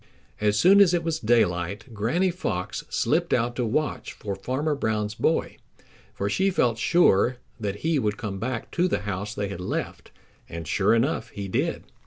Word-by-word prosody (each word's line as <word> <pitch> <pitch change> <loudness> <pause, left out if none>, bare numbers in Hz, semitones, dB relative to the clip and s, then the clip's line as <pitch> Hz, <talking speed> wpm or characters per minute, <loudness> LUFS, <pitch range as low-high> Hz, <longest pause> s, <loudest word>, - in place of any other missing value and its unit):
As 105 -1 +2
soon 195 +3 +7
as 180 -3 +5
it 170 - -1
was 165 -1 -1
daylight, 105 -1 0
Granny 145 - +1
Fox 95 - -3
slipped - - +1
out 120 +1 0
to 125 - -1
watch 150 +7 -2
for 100 -2 -5
Farmer 130 +10 -1
Brown's 105 -6 -1
boy, 160 +8 0 0.6
for 100 - -2
she 190 - +2
felt 120 -11 +1
sure 125 - +4 0.2
that 100 -3 -2
he 160 -3 +2
would 105 -4 -1
come 100 -4 -5
back 120 +1 -4
to 175 +1 +2
the 180 - -1
house 100 +1 -4
they 100 -1 -2
had 100 -2 -6
left, 90 - -4 0.4
and 85 -1 -6
sure 100 +6 +3
enough 130 +7 0
he 100 -1 -6
did. 95 - -1
110 Hz, 180 wpm, -25 LUFS, 100-155 Hz, 0.6 s, soon